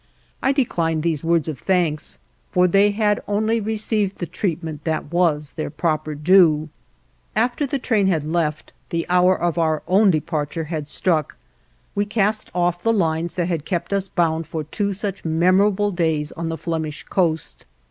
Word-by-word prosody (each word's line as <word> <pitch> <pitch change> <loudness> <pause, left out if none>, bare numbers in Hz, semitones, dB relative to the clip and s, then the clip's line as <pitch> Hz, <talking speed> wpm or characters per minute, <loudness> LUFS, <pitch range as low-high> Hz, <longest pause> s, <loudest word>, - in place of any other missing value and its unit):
I 265 - +3
declined 165 - 0
these 160 -4 -1
words 165 -1 +2
of 155 -4 -4
thanks, 175 -5 0 0.3
for 180 0 +3
they 195 +3 +4
had 210 0 +1
only 220 +2 +1
received 215 -2 -1
the 175 - -3
treatment 160 -4 -3
that 160 -1 -3
was 155 -5 +1
their 155 - -4
proper 155 0 -1
due. 155 -1 +4 0.7
After 245 +6 +1
the 275 - -1
train 220 -6 +1
had 160 -6 +1
left, 155 -2 -2 0.2
the 165 0 -1
hour 180 +1 +4
of 175 -1 0
our 160 -2 +1
own 195 +3 +5
departure 155 0 -1
had 155 -2 -4
struck; 155 -1 0 0.6
we 205 - 0
cast 210 0 0
off 175 0 +1
the 225 - +2
lines 165 -5 0
that 175 -2 0
had 165 -5 -2
kept 175 +4 -3
us 195 -1 0
bound 165 -2 0
for 160 -1 -4
two 200 +7 -2
such 200 0 -4
memorable 185 +5 +3
days 160 -4 0
on 165 0 -4
the 165 - -3
Flemish 160 -1 -4
coast. 165 -4 -1
170 Hz, 170 wpm, -21 LUFS, 160-200 Hz, 0.7 s, own